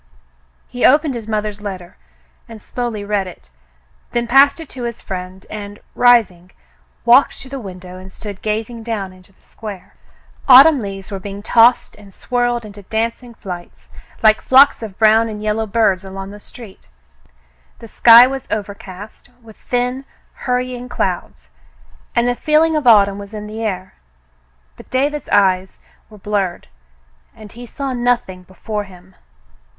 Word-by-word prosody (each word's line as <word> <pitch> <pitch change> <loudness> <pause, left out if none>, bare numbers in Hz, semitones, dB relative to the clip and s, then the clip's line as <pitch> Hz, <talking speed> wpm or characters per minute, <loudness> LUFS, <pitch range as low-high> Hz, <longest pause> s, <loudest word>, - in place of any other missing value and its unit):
He 245 - -6
opened 295 +1 +4
his 230 -3 -7
mother's 210 -1 -3
letter 185 -4 -7 0.5
and 225 -1 -10
slowly 235 -1 -5
read 205 -2 -1
it, - - -14 0.6
then 240 0 0
passed 270 +6 +5
it 325 - -9
to 250 -2 -6
his 235 -1 -5
friend 185 0 -7
and, 205 -1 -8 0.2
rising, 215 -8 +3 0.6
walked 245 +4 +5
to 265 - -10
the 275 0 -6
window 185 -3 -10
and 190 +1 -12
stood 205 0 -9
gazing 220 +2 -3
down 215 -5 -4
into 185 +1 -19
the - - -32
square. 210 -4 -10 0.5
Autumn 275 +3 +8
leaves 195 -1 -7
were 195 - -4
being 200 +1 -8
tossed 235 +2 +4
and 200 -2 -16
swirled 245 -1 -1
in 210 - -10 0.2
dancing 230 +2 -3
flights, 180 -5 -10 0.3
like 215 0 +5
flocks 270 +1 +5
of 210 -4 -8
brown 220 +1 +4
and 210 -1 -7
yellow 215 +1 -1
birds 205 -3 +1
along 195 0 -8
the 205 - -11
street. 210 -2 -13 0.9
The 230 - -12
sky 235 +2 +8
was 265 0 -5
overcast, 200 +1 -7
with 220 -2 -15
thin 250 +2 -2 0.3
hurrying 250 0 -3
clouds, 175 - -4 0.6
and 235 +1 +2
the 245 - +2
feeling 310 +4 +2
of 300 -4 -1
autumn 200 -3 +5
was 200 +1 -10
in 210 0 -6
the 215 +1 -7
air, 190 -4 -4 0.8
but - - -15
David's 285 +3 -1
eyes 190 -1 +2 0.3
were 215 - -14
blurred, 195 -3 -3 0.7
and 210 -2 -13
he 240 +1 -11
saw 275 +2 -5
nothing 240 -7 -1
before 205 +3 -6
him. 185 -1 -17
215 Hz, 155 wpm, -18 LUFS, 195-245 Hz, 0.9 s, Autumn